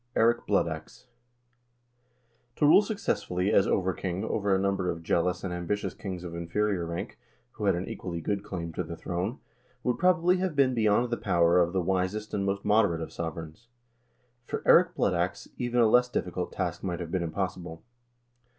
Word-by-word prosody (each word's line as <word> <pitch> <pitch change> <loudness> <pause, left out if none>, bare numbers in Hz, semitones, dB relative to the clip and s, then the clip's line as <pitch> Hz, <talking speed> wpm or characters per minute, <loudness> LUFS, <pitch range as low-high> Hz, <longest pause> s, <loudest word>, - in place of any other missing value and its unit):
Eirik 115 +1 +3
Blood - - +3
Ax - - -8 1.5
To - - +2
rule 150 - +8
successfully 110 - -1
as 100 - +4
over 95 -1 +1
king 90 +3 -3
over 105 -2 -1
a 95 - +4
number 95 -2 0
of 85 -1 -4
jealous 90 +3 0
and 95 -2 -3
ambitious 90 +4 -2
kings 95 -3 -6
of 85 -2 -7
inferior 85 +2 -1
rank, 85 +1 -5 0.3
who 105 - -5
had 100 - +3
an 90 +2 -4
equally 85 -2 -5
good 100 +4 -2
claim 85 -3 -5
to 90 - -2
the 85 0 -7
throne, 90 - -3 0.5
would, 125 - 0
probably, 180 0 +4
have 185 -4 -2
been 135 -2 +3
beyond 115 +1 +2
the 120 - 0
power 85 -2 +3
of 85 -1 +2
the 95 0 0
wisest 95 +4 -1
and 100 -1 -1
most 100 0 -2
moderate 100 -6 +3
of 80 - -6
sovereigns; 80 +5 -6 0.8
for - - -4
Eirik - - +6
Blood - - +1
Ax 90 +2 -2
even 120 -1 0
a 115 - +6
less 125 +3 +4
difficult 90 -6 -3
task 90 -2 -3
might 90 -2 -3
have 85 -2 -6
been 95 - 0
impossible. 85 0 -4
95 Hz, 185 wpm, -28 LUFS, 85-110 Hz, 1.5 s, rule